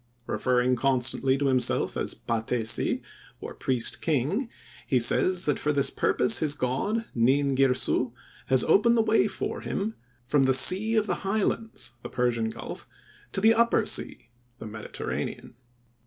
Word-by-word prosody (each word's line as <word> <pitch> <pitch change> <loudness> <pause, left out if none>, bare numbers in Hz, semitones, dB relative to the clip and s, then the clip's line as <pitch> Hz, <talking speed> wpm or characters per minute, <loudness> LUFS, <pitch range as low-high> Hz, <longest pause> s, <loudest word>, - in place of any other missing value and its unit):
Referring 125 0 0
constantly 130 +1 0
to 140 - -2
himself 130 -2 +1
as - - -3
patesi, 115 0 -1 0.4
or - - -8
priest 125 -3 -1
king, 165 - -1 0.4
he 130 - +1
says 180 +10 +5
that 145 - 0
for 150 - -1
this 140 -1 +1
purpose 125 -2 +2
his 150 -2 +1
God, 200 - -2
Nin 135 +4 +1
Girsu, 130 -2 0 0.4
has 130 -1 +4
opened 235 +8 +3
the 225 - +3
way 215 -2 +2
for 195 - -5
him 210 +3 -4 0.3
"from 140 +3 +1
the 130 -1 +3
sea 200 - +6
of 215 -1 +2
the - - -3
highlands,"—the 195 - -3
Persian 120 -2 -1
Gulf—"to 150 - -10
the 220 +2 +5
upper 230 -1 +2
sea," 115 - -2 0.3
the 115 - -10
Mediterranean. 105 -10 -6
135 Hz, 140 wpm, -26 LUFS, 125-195 Hz, 0.4 s, sea